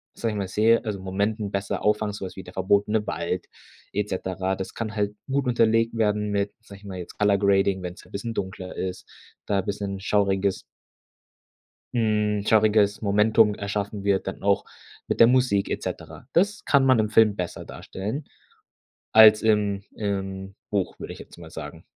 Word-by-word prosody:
sage 115 - -2
ich - - -4
mal, 100 -2 -2
sehe 110 +5 +3
also 105 -3 -3
Momenten 100 +3 -2
besser 100 0 -3
auffangen, 105 0 +1
so 100 - -6
was 95 - -8
wie 95 - -8
der 90 +1 -12
verbotene 100 +3 +1
Wald 90 +1 -3 0.5
et 105 +1 -1
cetera. 95 0 -2
Das 95 0 -6
kann 110 -1 -5
halt 105 -1 -1 0.2
gut 140 0 +1
unterlegt 115 -1 +2
werden 105 -2 +1
mit, 100 0 0
sage 100 -3 -13
ich 100 - -18
mal, 95 -2 -6
jetzt 90 -1 -9
color 105 -1 +3
grading 100 -1 +2
wenn's 90 +3 -7
'n - - -20
bisschen 115 +3 -4
dunkler 95 -2 -5
ist, 95 -1 -5 0.4
da 100 -1 +1
bisschen 100 0 -4
schauriges 100 -1 +1 1.3
hm, 105 -3 +1
schauriges 105 -2 +3
Momentum 105 +1 +3
erschaffen 100 0 -4
wird 100 -1 +1
dann 95 - -5
auch 100 0 +2 0.4
mit - - -2
der - - +9
Musik 125 -5 +2
et - - -2
cetera. - - -7
Das 205 +5 +2
kann 140 -2 +4
man 130 -3 +5
im 105 -1 +1
Film 110 -1 +5
besser 90 -3 -5
darstellen 110 +10 -6 0.9
als 110 -1 +8
im 105 -2 +1
im 95 -2 -4 0.2
Buch, 100 -3 -2
würde - - -6
ich - - -13
jetzt - - -13
mal 85 -2 -11
sagen. - - -8
100 Hz, 180 wpm, -25 LUFS, 95-110 Hz, 1.3 s, der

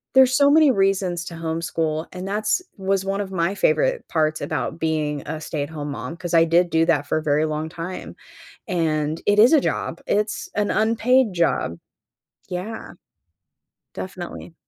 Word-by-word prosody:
there's 260 0 +6
so 280 0 +5
many 305 -3 +6
reasons 195 -4 +1
to 170 - -7
homeschool 160 -1 -2
and 185 +1 -6
that's 215 - 0
was 195 0 0
one 195 +1 -1
of 195 -1 -6
my 180 +1 0
favorite - - +1
parts 155 -1 0
about 160 +2 -3
being 150 -3 -1
a 155 0 -4
stay-at-home 150 -1 -4
mom 165 +3 -6
'cause 175 -1 -6
I 165 0 +6
did 170 +2 +3
do 160 0 +3
that 145 -4 +2
for 155 - +1
a - - -8
very 150 +1 +2
long 155 +1 -3
time. 170 +3 -7 0.5
And 160 -3 0
it 205 0 +3
is 235 +8 +7
a 295 - +6
job. - - -2
It's 210 +1 0
an 210 0 0
unpaid 230 +3 +3
job. 165 - 0 0.7
Yeah. 185 +5 -5 1.0
Definitely. 180 -2 -7
175 Hz, 165 wpm, -22 LUFS, 160-205 Hz, 1.0 s, is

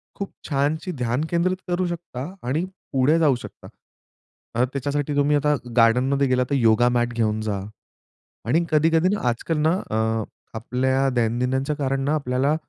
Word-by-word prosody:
खूप 200 - -5 0.2
छानशी 145 +5 0
ध्यान 125 -1 -1
केंद्रित 180 +2 +1
करू 175 0 0
शकता 170 -2 -6
आणि 155 +7 0 0.3
पुढे 135 +5 +3
जाऊ 145 -5 +4
शकता. - - -10 0.9
कारण 125 +2 +2
त्याच्यासाठी 145 +1 -2
तुम्ही 145 +1 +3
आता 150 0 +2 0.2
गार्डनमध्ये 130 +4 +4
गेलात 125 -1 +2
तर 140 - +1
योगा 120 -1 +4
मॅट 120 0 0
घेऊन 110 -2 0
जा 105 -2 -2 0.9
आणि 160 +8 +3
कधी-कधी 160 +3 +3
ना - - -5
आजकाल 150 +7 -2
ना - - +4 0.2
अ, 110 - -1 0.6
आपल्या 130 +3 0
दैनंदिनच्या 125 +5 0
कारण 135 -2 -1
ना 150 - +2
आपल्याला 140 +1 +1
135 Hz, 150 wpm, -23 LUFS, 125-155 Hz, 0.9 s, जाऊ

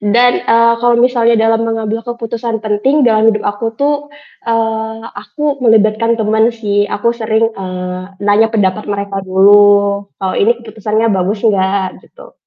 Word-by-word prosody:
Dan, 240 +4 +3 0.2
eee, 230 0 +4
kalau 240 -1 +2
misalnya 235 -1 +2
dalam 225 0 +2
mengambil 225 0 -3
keputusan 230 -1 -4
penting 260 +8 +1
dalam 220 -1 +3
hidup 215 -1 0
aku 205 +2 -3
tuh, 285 +3 +1 0.5
eee, 225 -1 -1 0.2
aku 280 +6 -4
melibatkan 225 +1 +2
teman 220 +1 +1
sih. 205 -3 -1
Aku 235 +3 -1
sering, 225 -1 -1
eee, 185 -1 -6 0.2
nanya 210 +2 +3
pendapat 210 -2 -1
mereka 200 -1 -3
dulu, 200 +2 +5 0.5
"Kalau 190 -1 -3
ini 235 +3 +2
keputusannya 220 0 -2
bagus 195 +3 -2
enggak?" 190 -2 0
Gitu. - - -17
220 Hz, 145 wpm, -14 LUFS, 205-230 Hz, 0.5 s, dulu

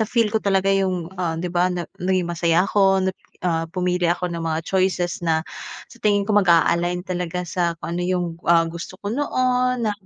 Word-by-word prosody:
na-feel 225 +1 +2
ko 220 - 0
talaga 195 -1 +2
yung, 185 -3 0
ah 170 -3 -2
'di 175 - -3
ba, 180 +1 +3
na 175 -1 -3 0.2
naging 185 -1 +1
masaya 170 +1 +2
ako 195 -2 +3
nap 190 - -2 0.3
ah, 165 -2 +1
pumili 180 0 -1
ako 175 +1 0
ng 170 -1 -4
mga 160 -1 -1
choices 185 -2 0
na 160 -1 +1 0.4
sa - - -17
tingin 205 -1 +2
ko 215 - -1
mag-a-align 175 -2 +3
talaga 180 -1 -3
sa 175 -1 -1
kung 170 0 -5
ano 175 - -2
yung, 180 0 0 0.2
ah, 170 -1 +5
gusto 170 +2 -7
ko 205 - -2
noon 250 -2 +1
na 215 - +1
180 Hz, 195 wpm, -22 LUFS, 170-195 Hz, 0.4 s, ah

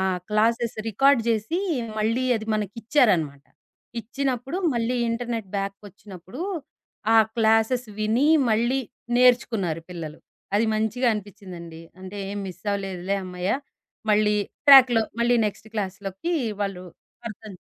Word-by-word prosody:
ఆ! - - 0 0.3
Classes 230 +2 +1
record 270 +4 +4
జేసి, 225 - 0 0.4
మళ్ళీ 230 +4 +1
అది 220 0 -6
మనకిచ్చారన్నమాట. 205 - +1 0.6
ఇచ్చినప్పుడు 260 - -3 0.2
మళ్ళీ 235 +2 0
ఇంటర్‌నెట్ 230 -3 -3
బ్యాకొచ్చినప్పుడు. 195 - -8 0.7
ఆ - - +7 0.2
క్లాసెస్ 225 +2 +3
విని, 225 +7 +2 0.2
మళ్ళీ 235 +5 +2 0.4
నేర్చుకున్నారు 225 -9 +3
పిల్లలు. 160 -3 -7 0.4
అది 225 +2 +2
మంచిగా 220 +4 0
అనిపించిందండి. 180 -5 -9 0.2
అంటే 190 +2 -8
ఏం 205 - -4
మిస్ 185 0 -11
అవ్వలేదులే, 195 -1 -2
అమ్మయ్య! 180 +1 -2 0.6
మళ్ళీ 210 0 +3 0.3
ట్రాక్‌లో 255 -4 +9 0.2
మళ్ళీ 240 +1 +3
నెక్స్ట్ 210 +1 -6
క్లాస్‌లోకి 195 - -3 0.3
వాళ్ళు 195 -3 -3 0.5
అర్థం 215 0 -10
215 Hz, 110 wpm, -24 LUFS, 195-240 Hz, 0.7 s, ట్రాక్‌లో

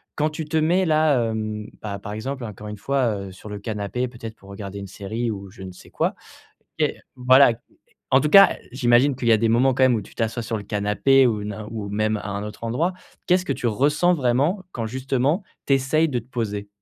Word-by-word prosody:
quand 150 +1 +1
tu 155 +1 -5
te 155 +1 -1
mets 175 +4 +2
là, 155 -7 +3
hem, 110 -1 -4
pa 100 -2 -4
par 100 +1 -7
exemple 130 +5 -5
encore 105 -1 -8
une 105 - -6
fois, 130 -1 0
heu, - - -11
sur 95 +3 -13
le 105 - -5
canapé 105 +4 -3
peut-être 115 -2 -9
pour 100 - -17
regarder 100 0 -7
une 100 - -7
série 110 +5 -4
ou 100 -2 -7
je 100 -1 -11
ne 95 - -7
sais - - -16
quoi, - - 0 0.7
OK - - +2 0.2
voilà 130 0 +6 0.6
en 130 - +6
tout 150 - 0
cas 195 +2 +8 0.2
j'imagine 125 +1 +3
qu'il 125 - -4
y - - +6
a 110 - +6
des 115 +1 +1
moments 125 +3 +3
quand 130 - 0
même 130 -1 +4
où - - -2
tu - - -16
t'assois 115 +1 -2
sur 115 0 -2
le 105 - -7
canapé 105 +6 +3
ou 110 -4 0
n'in 105 0 -6
ou 105 -3 -5
même 110 +1 0
à 105 - -7
un 100 +1 -4
autre 105 +1 -9
endroit, 150 +11 0 0.3
qu'est-ce 180 +1 +3
que - - 0
tu 125 - -3
ressens 150 +10 +2
vraiment, 145 +7 +1
quand 115 -2 -3
justement 130 - 0 0.2
tu 140 - +1
essaies 135 +4 +2
de 125 -4 -1
te 115 - -20
poser? 105 -5 -3
120 Hz, 230 wpm, -23 LUFS, 105-135 Hz, 0.7 s, cas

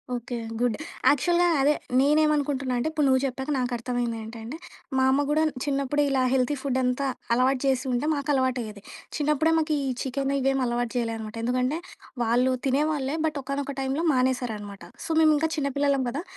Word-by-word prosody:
Okay. 240 0 -5 0.2
Good. 245 -3 +1 0.3
యాక్చువల్‌గా 345 +5 +3
అదే. 290 +2 +4 0.3
నేనేమనుకుంటున్నా 290 -2 +2
అంటే, 240 - -1
ఇప్పుడు 300 -2 +1
నువ్వు 260 -1 +4
చెప్పాక 265 +2 -4
నాకర్థమయిందేంటంటే, 240 0 -3 0.4
మా 260 - +3
అమ్మ 285 +2 +2
గూడా 305 +1 +3
న్ - - -9
చిన్నప్పుడే 280 0 0
ఇలా 265 -1 +2
హెల్తీ 265 +2 +2
ఫుడ్డంతా 260 0 0 0.3
అలవాటు 255 +2 +2
చేసుంటే, 260 0 0
మాకలవాటయ్యేది. 260 -7 -1 0.4
చిన్నప్పుడే, 300 +2 +2
మాకు 310 0 0
ఈ - - 0
చికెన్ 275 +1 -1
ఇవేమీ 270 0 +1
అలవాటు 240 -1 -1
చెయలే 230 -1 -1
అనమాట. 215 0 -7
ఎందుకంటే, 255 +5 0 0.4
వాళ్ళు 245 +3 +2
తినేవాళ్ళే, 285 +1 0
బట్, 310 -2 -1
ఒకానొక 275 +1 -3
టైమ్‌లో 270 +5 -1
మానేశారనమాట. 235 -7 -1 0.2
సో, - - -7
మేమింకా 310 0 +4
చిన్న 280 -2 0
పిల్లలం 280 -2 +2
కదా! 290 +8 -4
265 Hz, 150 wpm, -26 LUFS, 245-290 Hz, 0.4 s, అదే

